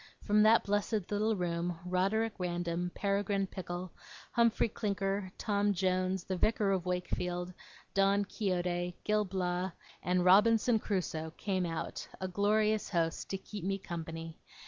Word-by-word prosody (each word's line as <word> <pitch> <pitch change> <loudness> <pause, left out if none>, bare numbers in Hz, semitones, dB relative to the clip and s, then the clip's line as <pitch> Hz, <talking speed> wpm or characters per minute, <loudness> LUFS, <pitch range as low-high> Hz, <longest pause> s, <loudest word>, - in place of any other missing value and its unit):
From 210 0 +4
that 220 +2 +6
blessed 205 -1 -1
little 215 +2 +1
room, 175 -1 -2
Roderick 195 +5 +1
Random, 175 0 -2
Peregrine 200 0 0
Pickle, 180 -1 -6 0.4
Humphrey 235 -1 +3
Clinker, 195 -3 -2
Tom 205 -1 +1
Jones, 185 0 0
the 190 - -3
Vicar 210 +1 +2
of 185 -2 0
Wakefield, 180 0 -2 0.4
Don 195 +1 +3
Quixote, 180 -4 -1
Gil 210 0 +2
Blas, 180 -1 -2 0.3
and 180 0 +1
Robinson 220 +4 +5
Crusoe, 165 -6 -2
came 185 -3 -1
out, 165 0 -4
a 185 - -2
glorious 210 +3 +2
host, 165 -3 -1
to 195 - -1
keep 205 0 -8
me 195 +1 0
company. 165 -3 -6
190 Hz, 135 wpm, -32 LUFS, 180-205 Hz, 0.4 s, that